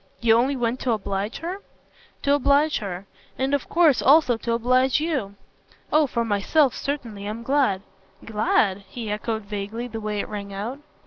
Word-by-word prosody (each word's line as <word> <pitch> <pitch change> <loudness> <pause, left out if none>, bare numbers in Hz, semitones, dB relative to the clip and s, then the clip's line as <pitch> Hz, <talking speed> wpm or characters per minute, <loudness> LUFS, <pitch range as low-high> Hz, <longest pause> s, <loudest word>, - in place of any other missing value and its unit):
"You 225 -1 +4
only 260 +4 +2
went 240 0 -1
to 245 - 0
oblige 200 0 -3
her?" 365 +4 -4 0.6
"To 280 - +3
oblige 285 +2 +3
her. 195 -3 -6 0.3
And 265 +2 0
of 285 - -1
course 325 -5 +4
also 280 -3 +5
to 230 +1 -2
oblige 255 +3 +3
you." 275 -11 -2 0.6
"Oh 305 -1 +5
for 235 -2 -1
myself 230 +7 +2
certainly 230 -8 -4
I'm 220 +2 -5
glad." 255 -7 +1 0.4
"'Glad'?" 210 -2 +1
he 225 -4 -5
echoed 220 +1 -2
vaguely 205 +3 -5
the 225 -2 -6
way 210 -1 -2
it - - -3
rang 200 -2 -6
out. 230 +8 -4
235 Hz, 170 wpm, -24 LUFS, 210-275 Hz, 0.6 s, also